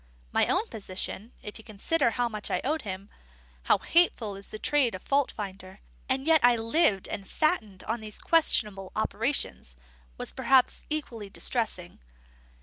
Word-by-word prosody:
My - - +3
own 380 +5 +1
position, 205 - -5
if 210 - -8
you - - -12
consider 235 +8 +1
how 245 +1 0
much 215 -2 -4
I - - 0
owed 305 +4 0
him, 195 -2 -7 0.5
how - - +5
hateful 245 - +3
is 195 0 -9
the - - -6
trade 260 -2 +2
of 185 - -9
fault 280 -1 +2
finder, 195 -1 -8 0.3
and 265 +1 0
that - - -6
yet 320 -1 +6
I 245 0 +6
lived 225 - +1
and 195 - -6
fattened 220 - -1
on 230 +2 -2
these 215 -1 -5
questionable 210 - +3
operations, - - -2 0.4
was - - -3
perhaps 265 -2 +2
equally 240 -9 -4
distressing. 205 -5 -2
225 Hz, 160 wpm, -28 LUFS, 200-275 Hz, 0.5 s, yet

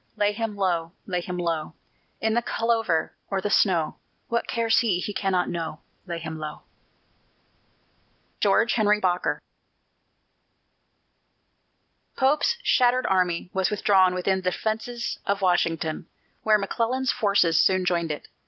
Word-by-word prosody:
Lay 205 0 +2
him 215 0 -3
low, 175 -4 -1
lay 180 -2 -2
him 180 +1 -5
low, 165 -2 -2 0.4
In 220 0 0
the 235 - +2
clover 225 -9 0 0.2
or 195 - 0
the 205 +2 -2
snow! 170 -8 +2 0.3
What 235 0 -1
cares 230 -1 +2
he? 220 -7 +1
he 205 - -4
cannot 190 -3 0
know: 165 -2 -4 0.3
Lay 170 -1 -3
him 160 -1 -6
low! 150 -1 -7 1.8
GEORGE 220 +3 +3
HENRY 210 -2 +3
BOKER. 180 -2 0 2.8
Pope's 295 - +2
shattered 250 0 +3
army 180 -1 0
was 190 -1 +1
withdrawn 190 -3 +3
within 190 +1 0
the 185 -1 0
defences 225 +4 -3
of 200 0 0
Washington, 165 -3 0 0.3
where 215 -1 +4
McClellan's 235 +6 -1
forces 200 -6 +3
soon 185 -1 +2
joined 170 -2 0
it. 150 - -5
190 Hz, 130 wpm, -25 LUFS, 175-220 Hz, 2.8 s, where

